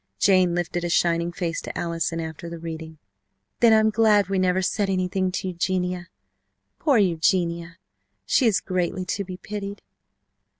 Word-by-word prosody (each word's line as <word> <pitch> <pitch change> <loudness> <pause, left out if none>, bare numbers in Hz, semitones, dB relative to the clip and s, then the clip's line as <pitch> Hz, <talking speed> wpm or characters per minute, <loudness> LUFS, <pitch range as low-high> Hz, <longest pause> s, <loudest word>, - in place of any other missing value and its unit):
Jane 185 - +4
lifted 175 0 -2
a 175 - -1
shining 170 0 +2
face 170 -1 -3
to - - -7
Allison 165 0 -2
after 160 +1 -6
the 170 - -7
reading. 160 -1 -7 0.6
"Then 235 -1 +6
I'm 220 0 +5
glad 210 -3 +3
we 195 -1 +1
never 185 0 +2
said 200 +2 0
anything 185 0 0
to 190 - -2
Eugenia! 180 0 -2 0.7
Poor 285 -6 +3
Eugenia! 170 -2 +1 0.5
She 255 - +3
is 215 - +2
greatly 185 0 -2
to 200 +2 -2
be 185 -1 -8
pitied!" 200 0 -6
180 Hz, 155 wpm, -24 LUFS, 170-195 Hz, 0.7 s, Then